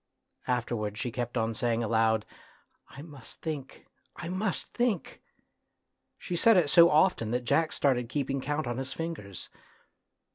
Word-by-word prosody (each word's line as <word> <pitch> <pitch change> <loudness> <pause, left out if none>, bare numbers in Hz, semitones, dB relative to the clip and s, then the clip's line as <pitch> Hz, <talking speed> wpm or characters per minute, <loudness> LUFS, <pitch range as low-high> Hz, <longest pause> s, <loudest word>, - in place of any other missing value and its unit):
Afterwards 115 -4 -2
she 120 - -3
kept 120 +1 -3
on 115 0 0
saying 115 +1 0
aloud, 110 -1 +2 0.3
" - - -37
I 140 - -8
must 145 -7 -13
think, 150 -5 -6 0.3
I 170 - -6
must 190 +2 -2
think! 240 -7 -1 0.5
" - - -53 0.3
She 180 - -5
said 225 +4 +5
it 155 -5 +3
so 170 -1 +8
often 155 - +3
that 125 +1 -2
Jack 160 +5 +2
started 125 -4 +1
keeping 135 -1 -2
count 145 +2 -2
on 120 0 -3
his 135 0 -4
fingers. 155 - -6
135 Hz, 155 wpm, -29 LUFS, 115-165 Hz, 0.5 s, so